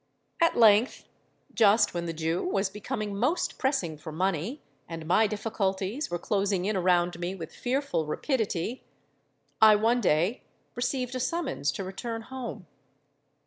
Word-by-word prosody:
"At 335 - +3
length—just 220 -1 +2
when 170 -1 -3
the - - -2
Jew 160 +2 -1
was 195 - 0
becoming 210 -1 -4
most 255 - 0
pressing 190 - -1
for 160 0 -8
money, 190 - -2 0.3
and 165 -1 -6
my 215 +7 +4
difficulties 205 +3 -2
were 175 - -2
closing 195 0 0
in 210 +1 0
around 175 -1 +2
me 175 +2 -3
with 165 -4 -8
fearful 255 - -1
rapidity—I 220 - 0
one 230 +4 +2
day 180 +4 +1 0.3
received 250 0 -2
a 255 - -2
summons 265 - -1
to 195 - -4
return 225 +4 -5
home. 260 0 -7
205 Hz, 135 wpm, -28 LUFS, 175-245 Hz, 0.3 s, my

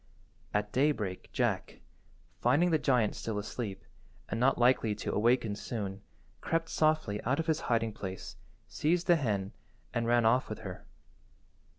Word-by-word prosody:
At 105 0 -1
daybreak 125 -10 0
Jack, - - -1 0.6
finding 175 +4 +3
the 160 - +3
giant 125 -7 +2
still 110 -2 -3
asleep, 105 -1 -5 0.5
and 110 - -2
not 130 +3 +3
likely 120 -3 +3
to 100 - -4
awaken 115 -1 +2
soon, 100 -2 -5 0.4
crept 165 0 -1
softly 155 -10 +1
out 140 +6 0
of 165 - 0
his 160 -2 +1
hiding–place, 110 -5 -2 0.3
seized 170 +3 0
the 175 - +6
hen, 100 -8 -1 0.4
and 120 -2 0
ran 120 -1 +4
off 125 +3 +3
with 110 - -6
her. 95 -4 -8
115 Hz, 145 wpm, -31 LUFS, 105-140 Hz, 0.6 s, the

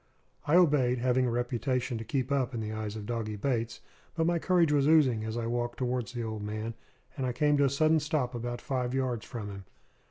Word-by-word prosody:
I 150 - +4
obeyed, 145 -8 +4
having 125 +1 +2
a - - +1
reputation 120 +1 -1
to - - -5
keep 130 +3 -2
up 130 -3 0
in - - -2
the 110 -1 -3
eyes 110 -1 -4
of 105 -2 -6
Doggy 110 -2 -3
Bates; 115 0 -2 0.3
but 165 -1 +1
my 170 0 +2
courage 175 -3 +3
was 145 -1 +3
oozing 135 -9 +4
as 110 +1 -3
I 115 - -2
walked 120 +1 -2
towards 125 -2 -2
the 120 -1 -3
old 110 -1 -4
man, 110 +2 -4 0.4
and 135 - -3
I 125 - -1
came 150 +3 +3
to 140 - +4
a - - +3
sudden 155 +3 +3
stop 145 -4 -1
about 120 0 -4
five 125 -1 -2
yards 125 -4 -1
from 110 -5 -6
him. 100 -1 -9
125 Hz, 225 wpm, -30 LUFS, 115-140 Hz, 0.4 s, I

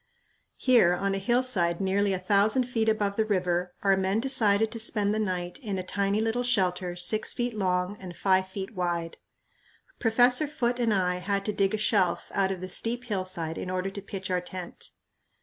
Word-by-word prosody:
Here, 230 -9 +4
on 195 +2 -1
a 195 - -1
hillside 200 -6 +1
nearly 195 +1 +1
a 190 - 0
thousand 205 +6 +2
feet 230 -3 0
above 205 -2 0
the 220 - +3
river, 180 -3 -1
our 195 -1 +4
men 190 +2 0
decided 225 -4 +2
to 230 - -5
spend 210 -2 0
the 215 - -1
night 180 -4 -3
in 210 -8 -4
a 185 - -3
tiny 200 +2 0
little 225 +2 0
shelter 185 -7 0
six 195 +5 0
feet 245 0 -1
long 185 -1 -1
and 180 -2 -9
five 190 -1 +2
feet 190 +2 -6
wide. 175 -3 -2 0.8
Professor 245 +5 +3
Foote 245 -4 -1
and 235 -2 +2
I 180 -3 +1
had 200 +2 -2
to 210 - -1
dig 195 +1 +1
a - - -2
shelf 200 -4 +1
out 195 -1 +1
of 190 -2 -4
the 185 - -4
steep 235 +6 -2
hillside 185 -7 -2
in - - -5
order 185 +1 -2
to 200 - -7
pitch 195 -1 -6
our 180 -1 +1
tent. 180 0 -7
195 Hz, 195 wpm, -27 LUFS, 185-220 Hz, 0.8 s, Here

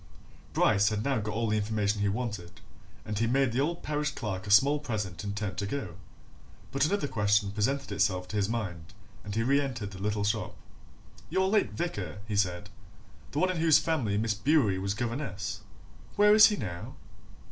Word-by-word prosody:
Bryce 105 +1 +3
had 105 0 -2
now 135 -2 +1
got 110 +1 -4
all 115 0 0
the 110 0 +1
information 105 -1 0
he 100 - +2
wanted, 105 -5 -4 0.5
and 105 -1 -3
he 115 - +2
made 135 +1 +2
the 120 - -1
old 170 +4 -2
parish 150 0 -1
clerk 100 -4 -4
a - - -5
small 140 +9 +5
present 105 - -4
and 100 0 -4
turned 100 -3 -3
to 100 - -2
go. 105 -6 -4 0.8
But 140 +2 +2
another 200 -4 0
question 105 -3 +1
presented 130 +5 -1
itself 95 -2 0
to - - -5
his 100 0 +1
mind 90 -6 -4 0.3
and 105 -1 -6
he 115 - +1
reentered 130 -5 0
the 95 -1 -9
little 105 0 -1
shop. 105 0 -1 0.7
"Your 190 0 +1
late 210 +1 +2
vicar?" 105 - -4
he 105 - -3
said. 100 0 -1 0.6
"The - - -7
one 185 +4 +3
in 180 - -4
whose 160 -2 +5
family 150 -11 0
Miss 110 +1 +1
Bewery 110 -4 +2
was 100 +1 -2
governess 115 -3 -4 0.5
where 210 0 +6
is 215 0 +9
he 210 - 0
now? 90 - -6
110 Hz, 190 wpm, -29 LUFS, 100-140 Hz, 0.8 s, is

